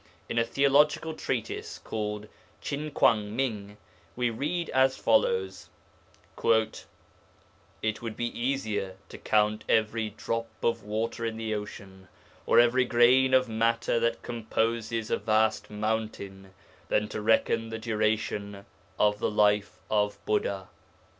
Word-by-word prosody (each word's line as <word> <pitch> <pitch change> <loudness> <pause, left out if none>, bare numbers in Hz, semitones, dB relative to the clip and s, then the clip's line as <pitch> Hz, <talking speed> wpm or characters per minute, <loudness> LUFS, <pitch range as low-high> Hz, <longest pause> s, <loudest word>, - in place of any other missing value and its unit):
In 115 - 0
a - - +4
theological 145 +5 +3
treatise 120 -7 -4
called 105 -1 -4 0.3
Chin 150 +2 -4
kuang 105 -7 +2
ming 105 -6 -3 0.4
we 125 -1 0
read 155 +9 -2
as 130 0 +3
follows: 95 0 +1 0.7
'It 110 -1 -3
would 115 -2 -6
be 120 0 -3
easier 110 -7 -1
to - - -10
count 105 0 +1
every 110 0 +1
drop 115 +2 -3 0.2
of 115 - +1
water 110 +3 -3
in 115 -1 -2
the 110 -1 -2
ocean, 100 -2 -7 0.4
or - - +6
every 120 +2 +4
grain 130 +2 +5
of 130 -1 +3
matter 115 +1 +1
that 115 0 -1
composes 115 -1 -2
a - - +2
vast 110 0 +1
mountain 105 -3 -4 0.4
than 105 - +1
to - - -4
reckon 115 +1 +2
the 115 - -4
duration 105 -2 -2 0.3
of 105 0 +2
the - - 0
life 105 -1 +2
of 105 -1 +1
Buddha.' 430 +3 -1
110 Hz, 125 wpm, -28 LUFS, 105-120 Hz, 0.7 s, or